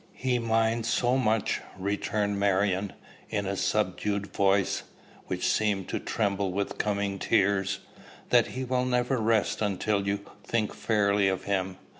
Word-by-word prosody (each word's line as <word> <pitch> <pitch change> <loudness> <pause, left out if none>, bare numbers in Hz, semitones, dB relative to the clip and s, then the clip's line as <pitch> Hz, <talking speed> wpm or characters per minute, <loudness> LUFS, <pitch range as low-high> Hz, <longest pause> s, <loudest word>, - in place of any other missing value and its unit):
"He 125 -1 0
minds 115 0 +1
so 120 +1 +2
much," 110 -4 +1 0.2
returned 100 +1 -1
Marion, 100 0 +1 0.4
in 100 -2 -1
a 100 +1 -1
subdued 100 0 -1
voice, 95 -1 +2 0.5
which 90 -1 -2
seemed 105 -3 +1
to - - -1
tremble 100 -3 -1
with 100 +2 -3
coming 100 -2 -1
tears, 95 0 +1 0.5
"that - - +5
he 130 - -4
will 125 0 0
never 125 0 +1
rest 110 -2 +1
until 100 0 0
you 100 0 0 0.2
think 110 0 -1
fairly 100 -2 +2
of 95 -1 -1
him. 95 -2 -1
100 Hz, 140 wpm, -28 LUFS, 100-110 Hz, 0.5 s, that